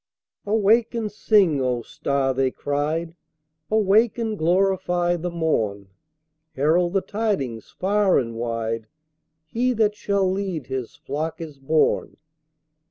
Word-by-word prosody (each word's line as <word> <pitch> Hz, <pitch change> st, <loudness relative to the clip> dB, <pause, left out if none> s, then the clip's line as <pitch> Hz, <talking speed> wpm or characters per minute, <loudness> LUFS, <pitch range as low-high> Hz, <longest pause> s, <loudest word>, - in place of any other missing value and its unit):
"Awake 220 Hz, +3 st, +3 dB
and 220 Hz, -3 st, -2 dB
sing, 195 Hz, -8 st, +3 dB
O 125 Hz, -2 st, -1 dB
star!" 135 Hz, +1 st, -1 dB
they 130 Hz, 0 st, +1 dB
cried. 150 Hz, +5 st, -2 dB, 0.6 s
"Awake 215 Hz, +2 st, +3 dB
and 225 Hz, -2 st, -2 dB
glorify 175 Hz, 0 st, +1 dB
the 175 Hz, +1 st, -3 dB
morn! 110 Hz, -, -1 dB, 0.7 s
Herald 170 Hz, +6 st, +2 dB
the 195 Hz, -, +2 dB
tidings 190 Hz, -, -2 dB
far 200 Hz, 0 st, +2 dB
and 115 Hz, -3 st, -1 dB
wide 115 Hz, -1 st, -3 dB, 0.6 s
He 245 Hz, +9 st, 0 dB
that 215 Hz, -2 st, +2 dB
shall 200 Hz, -2 st, 0 dB
lead 185 Hz, -6 st, -2 dB
His 130 Hz, -2 st, -5 dB
flock 155 Hz, +4 st, -4 dB
is 155 Hz, -4 st, -8 dB
born!" 155 Hz, +3 st, +1 dB
170 Hz, 120 wpm, -23 LUFS, 135-200 Hz, 0.7 s, Awake